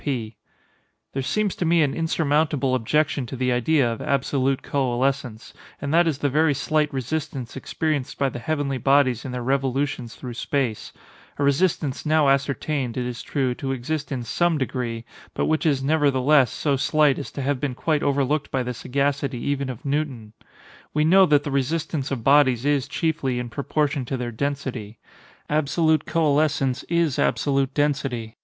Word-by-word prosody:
P. 120 -6 -3 0.8
There 135 - -1
seems 205 +8 0
to - - -1
me 165 -1 +4
an 140 - 0
insurmountable 150 -4 +1
objection 140 +2 +1
to 130 - -6
the 125 0 0
idea 125 +2 +2
of 115 - -8
absolute 135 -1 0
coalescence;—and 135 +1 -2
that 170 +1 +5
is 155 -4 0
the 145 - 0
very 150 +1 +2
slight 150 +1 0
resistance 135 -2 -4
experienced 145 0 -2
by 140 - +1
the 125 - -7
heavenly 140 0 -2
bodies 135 -3 +3
in 130 - -4
their 125 -1 -4
revolutions 135 -1 -1
through 125 -2 -7
space—a 130 +2 -4
resistance 140 -1 +1
now 155 -2 +3
ascertained, 140 -2 0
it 125 - -1
is 120 -1 -5
true, 130 -4 -1
to 135 +2 -4
exist 150 +4 -4
in 130 -3 -2
some 175 +6 +1
degree, 120 -4 -3 0.3
but - - 0
which 155 +1 +1
is, 140 -3 +1
nevertheless, 140 -2 +3
so 145 +3 0
slight 150 +1 +2
as 140 - -6
to 140 - -4
have 140 -1 0
been 135 -2 -2
quite 155 +2 0
overlooked 140 +1 0
by 130 -1 -1
the 125 0 -3
sagacity 140 +2 -1
even 140 +2 -2
of 125 +1 -8
Newton. 135 -7 -2 0.6
We 150 0 +3
know 190 +3 +6
that 145 -1 +4
the 145 - -4
resistance 140 +1 -1
of 130 -5 -3
bodies 135 -3 +4
is, 145 -2 +1
chiefly, 145 -4 -1
in 125 -1 -4
proportion 140 +2 -1
to 130 +2 -3
their 120 -1 -4
density. 125 -4 -4 0.5
Absolute 155 +1 +1
coalescence 145 -4 +1
is 170 -5 +1
absolute 135 -1 +1
density. 135 -6 -1
140 Hz, 165 wpm, -23 LUFS, 130-150 Hz, 0.8 s, know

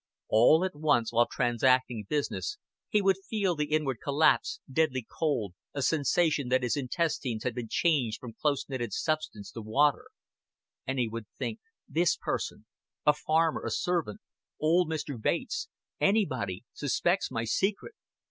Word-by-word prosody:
All 140 +11 +5
at 190 - -3
once 145 -7 +1
while 120 +1 +4
transacting 120 -2 +1
business 150 - -2 0.3
he 210 -2 +2
would 190 -1 +4
feel 200 -5 +1
the 150 -1 0
inward 145 -6 0
collapse, 155 - +2
deadly 140 -7 +1
cold, 130 - -1 0.2
a 140 - -1
sensation 150 -2 +2
that 130 0 +2
his 120 - +1
intestines 135 -4 -1
had 125 - -1
been 120 -1 -5
changed 135 -10 +1
from 120 -3 -9
close 140 +4 -1
knitted 120 -6 -3
substance 155 -11 -2
to 115 - -7
water; 135 +7 +2 0.8
and 135 +1 -1
he 120 -2 +1
would 110 -1 -6
think 120 -5 -3 0.3
"This 165 +3 +2
person" - - -4 0.4
a 150 - +6
farmer, 160 +2 +1
a - - -2
servant, 170 - -1 0.4
old 165 +2 +3
Mr. 145 -6 -4
Bates, 450 - -1 0.3
anybody 130 - +1
"suspects 175 +6 0
my 115 -3 -2
secret. 195 - -1
145 Hz, 150 wpm, -29 LUFS, 120-160 Hz, 0.8 s, a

